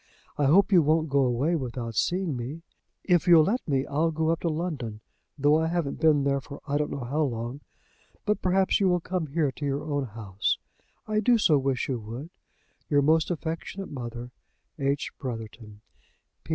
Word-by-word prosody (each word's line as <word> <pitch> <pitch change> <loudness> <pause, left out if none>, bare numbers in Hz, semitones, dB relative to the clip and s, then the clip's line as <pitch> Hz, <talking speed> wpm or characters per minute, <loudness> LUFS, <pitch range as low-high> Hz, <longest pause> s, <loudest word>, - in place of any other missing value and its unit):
I 145 - +1
hope 195 +9 +5
you 180 -3 +7
won't 155 +1 +2
go 140 - +3
away 130 +7 +1
without 120 -5 -4
seeing 175 - 0
me. 135 +7 -6 0.4
If 180 -1 +2
you'll 170 -3 +8
let 230 +9 0
me, 135 -2 +1
I'll 155 +4 +1
go 160 0 0
up 165 0 +1
to 170 - -1
London, 155 -10 -3 0.4
though 145 +2 +4
I 160 - +1
haven't 165 -4 -2
been 150 -3 +4
there 140 0 +1
for 140 +2 -10
I 145 0 0
don't 150 - -1
know 140 - -4
how 140 +6 -1
long. 120 0 -2 0.6
But 210 -1 0
perhaps 190 +1 +2
you 195 -2 +3
will 180 0 +2
come 175 -1 -3
here 150 -1 0
to 145 - -10
your 140 0 -1
own 145 -2 -1
house. 105 -4 -2 0.5
I 215 0 +1
do 235 +3 +4
so 155 -9 +4
wish 135 -2 -1
you 130 -3 -2
would. 120 +9 -8 0.6
"Your 145 -1 +3
most 160 +2 +3
affectionate 170 +3 -4
mother, 120 -2 -6 0.5
"H. 140 +1 -1
BROTHERTON. 110 -4 -7
145 Hz, 185 wpm, -27 LUFS, 130-165 Hz, 0.6 s, you'll